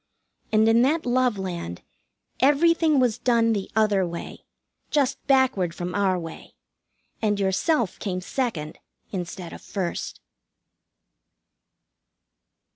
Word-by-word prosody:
And 220 0 +4
in 225 +1 +5
that 305 +6 +2
Love 250 -2 +2
Land 175 - -5 0.6
everything 310 +2 +4
was 245 -3 +1
done 230 -2 +3
the 200 -3 -3
other 210 -3 +3
way, 170 -1 -6 0.4
just 280 -3 +1
backward 260 -11 +2
from 180 0 -4
our 195 -2 +2
way, 165 -2 -9 0.7
and 210 -2 +1
yourself 200 - +1
came 185 -3 -2
second 180 - -3 0.3
instead 175 -2 -5
of - - -10
first. 185 -4 -4
215 Hz, 110 wpm, -25 LUFS, 185-255 Hz, 0.7 s, in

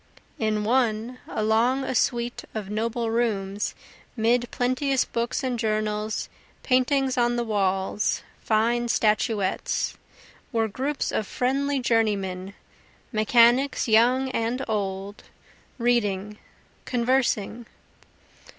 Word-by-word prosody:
In 215 -1 0
one, 235 +1 0
along 225 +5 +1
a 265 - -2
suite 240 0 0
of 210 -2 -4
noble 230 +1 -1
rooms, 205 -3 -1 0.4
'Mid 235 +2 +2
plenteous 255 +2 +1
books 235 +4 -2
and 250 -2 -1
journals, 215 -1 -1 0.4
paintings 260 0 +2
on 240 0 +2
the 240 - 0
walls, 195 -2 0 0.2
fine 235 +2 +1
statuettes, 215 -3 0 0.6
Were 225 -3 +1
groups 270 +7 -2
of 215 - -1
friendly 275 +3 0
journeymen, 200 -5 0 0.6
mechanics 240 +5 +4
young 250 +4 +4
and 240 +3 -1
old, 200 -2 -3 0.6
Reading, 210 -4 0 0.5
conversing. 240 -2 0
230 Hz, 95 wpm, -25 LUFS, 215-250 Hz, 0.6 s, mechanics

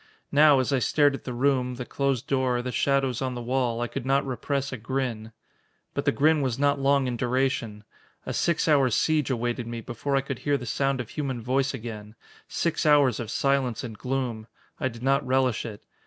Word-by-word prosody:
Now, 145 0 +6
as 130 +2 +1
I 135 - +3
stared 145 +2 +3
at 135 - -7
the 130 - -4
room, 125 0 +1
the 125 0 -6
closed 135 -3 -1
door, 130 -3 0
the 125 - -3
shadows 135 -2 +1
on 130 -1 -2
the - - -4
wall, 120 -1 0
I 120 - 0
could - - -5
not 135 +2 +1
repress 135 +1 -2
a - - -4
grin. 115 -1 -3 0.6
But - - -2
the - - +4
grin 150 +5 +3
was 130 -3 -1
not 140 0 +2
long 140 0 +3
in 125 -1 -2
duration. 120 -4 -1 0.4
A - - -3
six 170 -1 +1
hour 140 -4 +4
siege 150 +4 +1
awaited 120 -1 -2
me 115 0 -5
before 120 +4 -3
I 135 - +3
could 135 -2 -5
hear 145 -1 +1
the 125 - -7
sound 135 +2 0
of 120 - -9
human 135 -5 -3
voice 135 +4 0
again 110 -3 -8 0.3
six 165 -2 -1
hours 145 -5 +4
of 115 -3 -5
silence 135 -3 0
and 115 -3 -6
gloom. 125 -2 -3 0.3
I - - 0
did 120 -1 -8
not 135 +2 +2
relish 130 -2 +1
it. 105 -2 -10
130 Hz, 210 wpm, -26 LUFS, 120-140 Hz, 0.6 s, Now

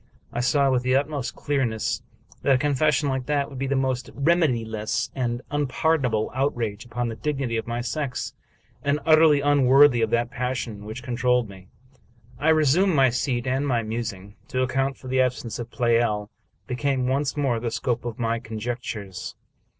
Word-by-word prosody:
I 120 - -2
saw 135 +2 +3
with 125 -1 +2
the 130 +1 +1
utmost 140 -2 -1
clearness 130 -7 -1 0.4
that 135 - +4
a - - +4
confession 150 +1 +2
like 130 -2 -2
that 145 -1 0
would 135 - -7
be 135 - -1
the 140 - 0
most 130 -1 -1
remediless 125 -9 +1
and 120 -1 -2
unpardonable 145 -5 +1
outrage 120 -5 -1
upon 120 +1 -3
the 115 - -5
dignity 135 -3 -2
of 115 - -2
my 120 +1 -2
sex, 135 +1 -3 0.5
and 145 +1 +1
utterly 155 -2 +6
unworthy 140 -2 +5
of 110 - +2
that 120 +1 0
passion 125 -5 -3
which 110 +4 -7
con 125 -2 -3
trolled 125 -2 +2
me. 95 -2 -13 0.7
I 155 - +2
resumed 160 +4 +4
my 135 -3 +5
seat 120 0 -1
and 135 +3 0
my 120 -4 +1
musing. 110 -3 -5
To 130 0 0
account 135 +1 0
for 130 - -12
the 130 0 +2
absence 125 -2 -2
of 120 -1 -5
Pleyel 115 -3 +1 0.3
became 130 0 -1
once 135 +3 0
more 135 -5 +1
the 115 0 -2
scope 120 +1 -2
of 120 -1 -5
my 115 -1 0
con 115 -1 -7
jectures. 110 -5 -5
125 Hz, 175 wpm, -24 LUFS, 115-140 Hz, 0.7 s, utterly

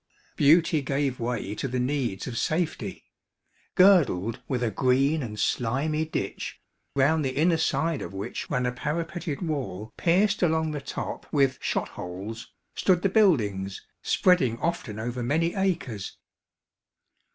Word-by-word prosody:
Beauty 160 +2 +4
gave 135 -1 -1
way 115 -4 -2
to 120 - -3
the 130 0 -2
needs 125 -6 -1
of 125 - -5
safety. 155 +6 -2 0.7
Girdled 140 - +4
with 125 -2 -1
a 115 - 0
green 135 +8 +2
and 105 -4 -6
slimy 140 +9 0
ditch, 155 - -4 0.4
round 150 +3 +3
the 130 -1 -2
inner 165 +3 +3
side 160 -1 0
of - - -6
which 95 +1 -5
ran 125 0 0
a 125 - +1
parapeted 160 +5 -3
wall 130 - -3
pierced 195 +5 +2
along 160 -2 +2
the 145 -2 -4
top 140 - -6
with 135 -3 +2
shot - - -1
holes, 100 +6 -7 0.2
stood 180 -2 +2
the 195 - +3
buildings, 105 - +2 0.2
spreading 165 -11 +3
often 135 -9 -3
over 120 +3 -3
many 160 +8 +1
acres. 170 - -2
140 Hz, 140 wpm, -26 LUFS, 120-165 Hz, 0.7 s, Beauty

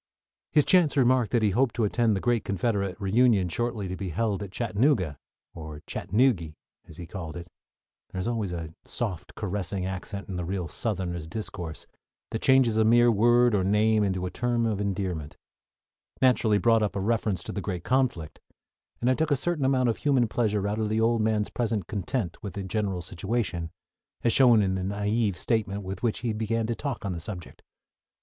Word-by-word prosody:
His 150 -2 +4
chance 170 -6 +4
remark 125 -3 +3
that 115 0 +1
he 105 - +3
hoped 120 +4 +1
to 115 - 0
attend 110 +1 +2
the - - -1
great 120 -3 +1
Confederate 100 -1 -1
reunion 105 -1 +3
shortly 115 +1 -2
to 95 - -4
be 95 -1 -4
held 105 +4 -1
at 100 - -5
Chattanooga, 105 - +1 0.3
or 75 -2 -8
Chattanoogy, 100 - +1 0.3
as 80 - -13
he 85 - -7
called 85 -2 -7
it 85 0 -8 0.6
(there 95 - -6
is 90 - -2
always 110 -6 -1
a 80 -2 -5
soft, 95 -8 -5
caressing 100 -2 -3
accent 95 +1 -5
in 95 - -5
the 90 - -2
real 90 0 -3
Southerner's 90 -5 -3
discourse 85 -4 -6 0.5
that 110 - -3
changes 130 -4 +4
a 110 - +5
mere 120 +2 +5
word 120 +2 +4
or 100 -2 +2
name 105 +2 +3
into 95 -2 -1
a 90 - -4
term 120 -1 0
of 105 -3 -1
endearment), 90 -6 -3 0.8
naturally 120 -5 +4
brought 115 +2 +3
up 105 - -1
a - - -1
reference 105 -1 0
to - - -6
the 100 - -4
great 90 -2 -4
conflict, 125 - 0 0.6
and 120 - 0
I 130 - +5
took 155 +3 0
a 145 - +4
certain 150 +1 -1
amount 130 -2 +3
of 115 - 0
human 135 -5 +2
pleasure 105 -3 0
out 105 +2 -2
of 110 -1 0
the 110 +1 +1
old 115 0 +2
man's 110 -1 0
present 110 -6 -1
content 100 -2 -3
with 100 -5 -6
the 100 - -4
general 95 -2 -2
situation, 95 -1 -2 0.5
as 115 - +3
shown 120 -5 +6
in 95 -1 0
the 95 - -2
naïve 105 +2 0
statement 100 -1 -1
with 95 0 -6
which 115 -3 -1
he 120 -3 -1
began 110 +1 -1
to 115 - -1
talk 130 -3 -4
on 100 - -1
the 85 - -5
subject. 90 0 -8
105 Hz, 195 wpm, -27 LUFS, 95-120 Hz, 0.8 s, shown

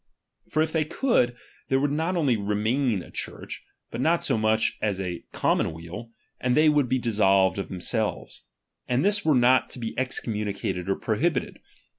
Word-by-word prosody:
For 155 - +2
if 160 - -3
they 160 -1 +1
could, 150 - +1 0.3
there 135 - +3
would 145 +1 +1
not 165 +5 -1
only 140 -7 +2
not 100 -2 -4
remain 110 0 0
a - - -14
Church, - - -6 0.3
but - - -4
not 165 +5 +2
so - - +1
much 110 0 +1
as 105 -3 -1
a 90 -3 -4
commonweal, 85 +8 -2 0.3
and 125 +1 +1
they 155 0 +6
would 145 -4 +2
be 130 - +2
dissolved 100 -5 +2
of 100 - -4
themselves; 105 +4 -2 0.5
and 125 +5 +1
this 205 0 +3
were 155 -3 +3
not 125 +1 +4
to - - -7
he 115 -2 -4
CTComnninicated 105 -7 -3
or 95 - +1
prohibited. 130 +7 -1
120 Hz, 175 wpm, -26 LUFS, 105-145 Hz, 0.5 s, they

